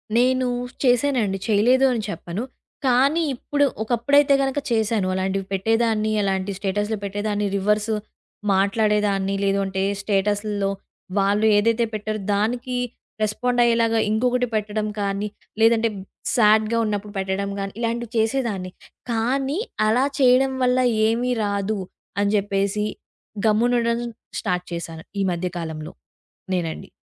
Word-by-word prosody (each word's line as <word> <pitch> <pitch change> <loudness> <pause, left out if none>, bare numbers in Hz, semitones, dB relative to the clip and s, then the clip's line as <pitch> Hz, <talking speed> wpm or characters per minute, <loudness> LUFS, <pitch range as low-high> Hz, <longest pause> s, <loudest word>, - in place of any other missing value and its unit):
నేను 255 +1 +3 0.4
చేశానండి. 245 -6 +2
చేయలేదు 245 +6 +4
అని 230 - -1
చెప్పను. 175 +6 -4 0.4
కానీ 270 +6 +3
ఇప్పుడు 285 +3 +1 0.2
ఒకప్పుడైతే 275 +5 +3
గనక 270 +1 0
చేశాను. 220 -3 +1
అలాంటివి 190 +1 -1
పెట్టేదాన్ని, 220 +2 +1
అలాంటివి 190 0 -1
స్టేటస్‌లో 205 +2 -1
పెట్టేదాన్ని, 205 +1 -1
రివర్స్ 210 +2 +1 0.6
మాట్లాడేదాన్ని. 200 0 +1
లేదు 195 0 +2
అంటే 190 0 -2 0.2
స్టేటసుల్లో 205 0 0 0.5
వాళ్ళు 205 +2 +2
ఏదైతే 230 +2 +2
పెట్టారో 215 0 -3 0.2
దానికి 245 +4 -1 0.5
రెస్పాండ్ 245 +4 0
అయ్యేలాగా 230 -1 +3
ఇంకొకటి 250 +2 +1
పెట్టడం 215 0 -1
కానీ, 200 +1 -1 0.3
లేదంటే 225 0 +4 0.5
సాడ్‌గా 215 0 +4
ఉన్నప్పుడు 205 -1 -3
పెట్టడం 190 +1 -2
గానీ, 195 0 -3
ఇలాంటివి 235 0 -2
చేసేదాన్ని. 220 -5 0 0.4
కానీ, 265 +7 0 0.3
అలా 245 +5 +3
చేయడం 265 +1 +4
వల్ల 250 0 +3 0.3
ఏమీ 240 +3 0
రాదు, 200 +1 -1 0.4
అని 205 0 +2
చెప్పేసి 200 +1 0 0.6
గమ్మునుండడం 235 +1 +2 0.4
స్టార్ట్ 180 0 -1
చేశాను 165 -1 -6 0.2
ఈ - - +2
మధ్య 175 +1 -2
కాలంలో 160 -2 -5 0.6
నేనండి. 170 -3 -3
215 Hz, 115 wpm, -23 LUFS, 200-240 Hz, 0.6 s, చేయలేదు